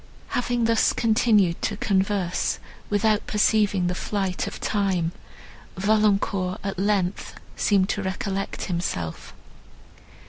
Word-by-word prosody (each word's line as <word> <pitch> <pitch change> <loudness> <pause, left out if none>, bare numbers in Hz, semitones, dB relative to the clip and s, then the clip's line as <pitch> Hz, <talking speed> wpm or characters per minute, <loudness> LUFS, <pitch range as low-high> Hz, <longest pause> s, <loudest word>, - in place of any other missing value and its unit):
Having 245 -1 0
thus 230 -1 +3
continued 215 -6 +3
to 205 - -1
converse, 195 -3 0 0.3
without 210 +1 +1
perceiving 210 -3 +2
the 180 - 0
flight 190 -1 -2
of - - -6
time, 190 -5 0 0.7
Valancourt, 200 -2 +1
at 195 -2 -3
length, 195 -2 0 0.2
seemed 195 -2 +2
to 205 - -1
recollect 195 +1 -3
himself. 170 - -4
200 Hz, 105 wpm, -24 LUFS, 185-210 Hz, 0.7 s, thus